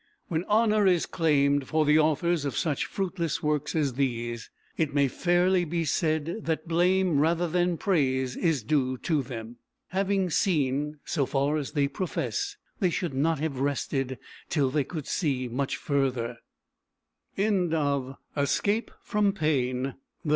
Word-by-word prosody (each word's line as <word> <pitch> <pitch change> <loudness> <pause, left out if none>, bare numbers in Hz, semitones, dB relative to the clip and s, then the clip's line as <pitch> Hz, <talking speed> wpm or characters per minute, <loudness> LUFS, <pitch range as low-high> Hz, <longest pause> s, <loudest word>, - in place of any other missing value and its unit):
When 165 +1 -1
honour 215 -1 +3
is 180 -3 +3
claimed 145 -4 +2
for 155 -1 +2
the 150 +1 +5
authors 160 +1 +2
of 140 - -3
such 150 -5 0
fruitless 175 -5 -2
works 150 0 0
as 145 -5 +1
these, 120 -3 -2 0.3
it 150 -3 -1
may 140 -1 +4
fairly 175 +5 +2
be 170 0 -1
said 160 +2 0
that 160 0 -1
blame 175 -1 +3
rather 170 +3 +2
than 175 +1 +1
praise 130 - +1
is 160 -8 +1
due 130 0 +1
to 155 +2 0
them. 120 -2 -7 0.3
Having 190 -1 0
seen, 150 -4 +1
so 140 -5 0
far 140 +2 +1
as 145 -3 -4
they 145 -3 +2
profess, 400 - -3 0.2
they 185 -5 +3
should 170 -3 -2
not 155 +4 +1
have 150 -5 -2
rested 135 -1 -1 0.3
till 140 -5 +1
they 145 +1 +1
could 155 -3 -6
see 135 -7 -1
much 130 +3 -2
further. 130 -4 -1 1.0
JENNER 200 +2 +2
AND 190 -5 +2
PASTEUR 140 -4 -1 0.2
SIR 140 -1 +1
J. 210 +3 +1 0.2
RISDON 210 -2 +2
BENNETT, 130 -8 0
M. 135 - -4
155 Hz, 155 wpm, -27 LUFS, 135-175 Hz, 1.0 s, the